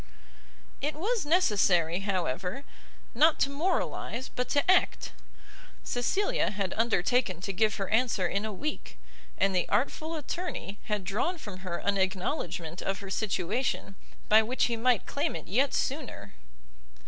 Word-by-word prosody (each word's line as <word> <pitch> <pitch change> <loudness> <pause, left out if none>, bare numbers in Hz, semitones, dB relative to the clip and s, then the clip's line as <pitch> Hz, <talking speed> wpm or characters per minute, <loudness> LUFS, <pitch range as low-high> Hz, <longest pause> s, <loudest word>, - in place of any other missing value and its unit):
It 295 +2 -1
was 410 +2 -1
necessary, 195 - +3
however, 190 - -2 0.5
not 315 0 +5
to 275 - +3
moralize, 280 -5 -1
but 250 - -3
to 285 +5 +3
act; 370 - +2 0.7
Cecilia 400 - +1
had 200 -3 -2
undertaken 225 -3 +1
to 195 +1 -3
give 215 +3 +2
her 195 -2 -3
answer 225 -4 +2
in 200 +3 -1
a 220 - -3
week, 295 +10 -5 0.4
and 195 -1 +2
the 180 - +1
artful 315 +5 0
attorney 305 - -4
had 210 -2 -1
drawn 220 - -1
from 205 - -8
her 185 -2 -4
an 200 0 0
acknowledgment 180 -3 -2
of 195 0 -1
her 200 -2 -8
situation, 200 +2 -1 0.3
by 215 +1 +7
which 240 +4 0
he 235 - 0
might 235 0 +2
claim 280 - -1
it 160 - -6
yet 260 +9 +2
sooner. 255 - -3
215 Hz, 145 wpm, -29 LUFS, 190-280 Hz, 0.7 s, by